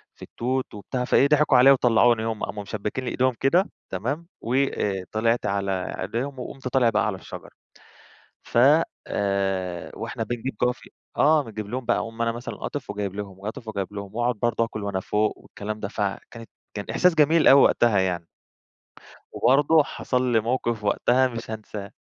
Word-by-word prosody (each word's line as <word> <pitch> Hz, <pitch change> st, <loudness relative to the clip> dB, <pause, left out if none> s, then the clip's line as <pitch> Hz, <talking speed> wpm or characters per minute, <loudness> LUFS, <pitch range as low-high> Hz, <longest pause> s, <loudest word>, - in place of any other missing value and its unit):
في -, -, -27 dB
التوت 130 Hz, +2 st, -3 dB
وبتاع." 125 Hz, +5 st, -4 dB
فإيه 140 Hz, -, +4 dB
ضحكوا 150 Hz, -3 st, +4 dB
عليّا 135 Hz, +2 st, +8 dB
وطلعوني، 120 Hz, -3 st, +4 dB
هُم 110 Hz, -1 st, -3 dB
قاموا 105 Hz, 0 st, -4 dB
مشبكين 105 Hz, +5 st, -4 dB
لي -, -, -2 dB
إيدهم 130 Hz, 0 st, +1 dB
كده، 175 Hz, +9 st, +2 dB, 0.2 s
تمام، 140 Hz, -, -3 dB
وآآ، 115 Hz, -6 st, 0 dB
طلعت 115 Hz, +2 st, +1 dB
على 100 Hz, -1 st, -1 dB, 0.3 s
أيديهم 130 Hz, +8 st, -3 dB
وقمت 130 Hz, +1 st, -7 dB
طالع 125 Hz, -2 st, +3 dB
بقى 115 Hz, -, +1 dB
على 105 Hz, -, -2 dB
الشجرة، -, -, -10 dB, 0.9 s
فآآ، 100 Hz, -, +1 dB
وإحنا 115 Hz, +1 st, -4 dB
بنجيب 120 Hz, +3 st, -4 dB
جوافة 125 Hz, 0 st, -1 dB, 0.3 s
آه، 150 Hz, +1 st, +4 dB
بنجيب 110 Hz, -4 st, -7 dB
لهم 125 Hz, +2 st, -4 dB
بقى، 120 Hz, -, +2 dB
أقوم 115 Hz, +1 st, -5 dB
أنا 115 Hz, 0 st, +1 dB
مثلًا 120 Hz, +2 st, -6 dB
قاطف 145 Hz, -, -6 dB
وجايب 100 Hz, -2 st, -4 dB
لهم، 100 Hz, -2 st, -7 dB
قاطف 110 Hz, +2 st, -7 dB
وجايب 100 Hz, -2 st, -4 dB
لهم، 100 Hz, 0 st, -7 dB
وأقعد 120 Hz, 0 st, 0 dB
برضه 120 Hz, -1 st, +1 dB
أكل 110 Hz, -2 st, -7 dB
وأنا 100 Hz, -2 st, -2 dB
فوق 105 Hz, +3 st, 0 dB
والكلام 105 Hz, +1 st, -7 dB
ده، 100 Hz, -, -3 dB
فكانت 105 Hz, +3 st, -5 dB, 0.2 s
كان 100 Hz, -, -5 dB
إحساس 180 Hz, -2 st, +3 dB
جميل 155 Hz, +2 st, +4 dB
أوي 140 Hz, 0 st, +8 dB
وقتها 115 Hz, -4 st, +4 dB
يعني. 90 Hz, -3 st, -1 dB, 1.0 s
وبرضه 145 Hz, +5 st, +4 dB
حصل 125 Hz, -2 st, -1 dB
لي 115 Hz, -, +4 dB
موقف 115 Hz, -1 st, -1 dB
وقتها 125 Hz, +5 st, +2 dB
مش 115 Hz, -2 st, -7 dB
هانساه. 105 Hz, -2 st, -7 dB
115 Hz, 165 wpm, -24 LUFS, 105-130 Hz, 1.0 s, عليّا